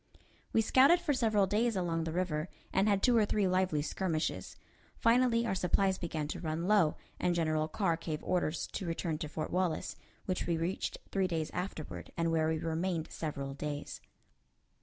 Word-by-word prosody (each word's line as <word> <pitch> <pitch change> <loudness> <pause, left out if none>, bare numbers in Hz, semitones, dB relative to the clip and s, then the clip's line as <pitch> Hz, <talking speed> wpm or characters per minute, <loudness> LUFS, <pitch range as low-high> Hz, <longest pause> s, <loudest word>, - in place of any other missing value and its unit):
We 225 - +3
scouted 275 +10 +6
for 335 -4 0
several 220 -6 +3
days 220 +4 +1
along 165 -3 -1
the 165 - -2
river, 170 -1 -1 0.2
and 195 +2 +3
had 200 -1 +2
two 245 - +5
or 225 - +5
three 205 -1 +1
lively 185 -5 +1
skirmishes. 165 -1 -2 0.4
Finally 235 0 +3
our 215 - 0
supplies 190 +1 +1
began 160 -3 -3
to - - -4
run 165 +1 -2
low, 195 -7 +4 0.2
and 180 -1 +1
General 155 -2 +1
Carr 170 -1 0
gave 160 -2 -4
orders 175 -3 0
to 190 - -3
return 165 -1 -2
to 155 - -4
Fort 155 0 -4
Wallace, 180 -3 -1 0.3
which 185 -1 -2
we 170 -1 +1
reached 170 +3 -2
three 195 -1 +1
days 160 -3 -2
afterward, 90 - -5
and 165 0 +1
where 160 -1 +2
we 160 0 +1
remained 165 +1 -2
several 140 -3 -4
days. 145 +1 -5
175 Hz, 180 wpm, -32 LUFS, 160-195 Hz, 0.4 s, scouted